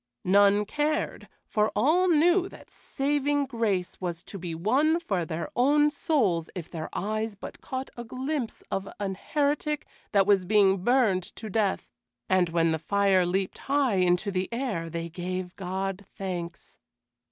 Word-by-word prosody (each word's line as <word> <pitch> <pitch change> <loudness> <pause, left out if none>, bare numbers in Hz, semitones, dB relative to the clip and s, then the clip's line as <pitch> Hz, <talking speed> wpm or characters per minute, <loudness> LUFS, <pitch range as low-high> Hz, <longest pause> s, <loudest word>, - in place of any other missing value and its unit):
None 200 +2 +4
cared, 300 +6 -1 0.2
for 215 0 +1
all 315 - +3
knew 350 +4 +4
that - - -15
saving 285 +1 0
grace 220 -10 -2
was 175 -1 -4
to 195 - -8
be 170 -2 -5
won 275 - +2
for 195 - -1
their 160 +1 -4
own 295 +4 +4
souls 215 - +1
if 175 -3 -7
their 160 -2 -5
eyes 215 +1 -2
but 195 - -10
caught 260 0 -5
a 240 - -6
glimpse 255 +1 -4
of 195 0 -2
an 195 -2 -2
heretic 295 +7 -1 0.3
that 200 -2 +4
was 200 -2 +4
being 195 -1 +3
burned 240 -6 +3
to 220 -2 -7
death, 205 -2 0 0.4
and 185 -2 +3
when 165 0 +2
the 160 - -1
fire 195 +1 +2
leaped 190 +1 -1
high 275 -7 +2
into 180 +2 +2
the 185 0 -1
air, 230 -10 -2
they 170 0 -4
gave 180 +1 -5
God 195 +1 -3
thanks. 175 -3 -6
200 Hz, 155 wpm, -27 LUFS, 180-270 Hz, 0.4 s, None